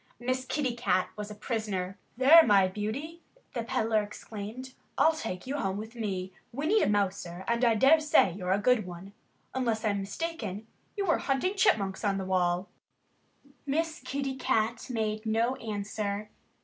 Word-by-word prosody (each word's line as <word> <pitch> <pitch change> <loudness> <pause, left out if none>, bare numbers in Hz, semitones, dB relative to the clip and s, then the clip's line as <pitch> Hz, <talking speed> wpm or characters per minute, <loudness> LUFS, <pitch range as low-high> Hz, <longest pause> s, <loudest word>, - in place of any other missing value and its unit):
Miss 255 +1 -1
Kitty 260 -4 -1
Cat 185 -6 +1
was 210 0 -6
a 210 - -8
prisoner. 205 -5 -3 0.2
"There, 285 +6 +9
my 200 -8 +5
beauty!" 235 - -4 0.3
the 240 - -2
peddler 225 -2 +1
exclaimed. 215 +5 -8 0.2
"I'll 320 - +5
take 205 - -5
you 275 +3 -3
home 195 -7 -1
with 220 +2 -7
me. 190 -5 -4 0.2
We 280 +5 -4
need 425 +7 +4
a - - +2
mouser. 190 -3 -1
And 235 +1 +1
I 230 -2 +5
dare 275 +8 +6
say 300 -11 +4
you're 180 0 -3
a 195 - +4
good 215 -1 +2
one. 180 +3 -9 0.4
Unless 235 -4 -1
I'm 200 -2 +1
mistaken, 215 - -4 0.3
you 400 - 0
were 335 - +2
hunting 275 +8 0
chipmunks 215 - +2
on 200 -2 +1
the 190 - -3
wall." 180 0 +1 1.0
Miss 320 +2 -1
Kitty 270 +1 -3
Cat 230 -1 0
made 215 -2 -2
no 230 +4 +1
answer. 210 -1 -4
220 Hz, 165 wpm, -29 LUFS, 200-260 Hz, 1.0 s, There